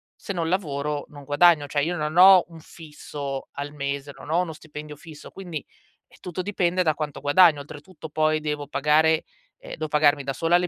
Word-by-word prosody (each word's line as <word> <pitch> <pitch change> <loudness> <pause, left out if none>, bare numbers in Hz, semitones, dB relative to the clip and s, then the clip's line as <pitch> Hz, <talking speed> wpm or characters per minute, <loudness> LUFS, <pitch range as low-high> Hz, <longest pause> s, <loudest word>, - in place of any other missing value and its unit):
"se 200 - -6
non 165 -3 -2
lavoro 150 -5 -2
non 145 -1 -12
guadagno." 145 +1 +4
Cioè, 145 +1 0
io 175 +3 -1
non 155 +1 -3
ho 185 0 +8
un 165 -1 -13
fisso 150 -4 -8
al 145 +1 -6
mese, 140 0 -4
non 150 - -9
ho 175 +2 +3
uno 165 -3 -4
stipendio 150 -1 -10
fisso, 150 +1 -12
quindi, 175 -6 -7 0.4
eh, - - -21
tutto 180 0 -5
dipende 185 -2 0
da 155 -3 +1
quanto 150 -3 -5
guadagno. 150 +1 +5
Oltretutto 150 +3 -11
poi 155 0 +1
devo 150 -1 -3
pagare 150 +3 +2 0.4
ehm, - - -8
devo 155 - -3
pagarmi 150 -1 +3
da 135 - -2
sola 165 +6 +2
le 180 0 -1
155 Hz, 195 wpm, -24 LUFS, 145-170 Hz, 0.4 s, ho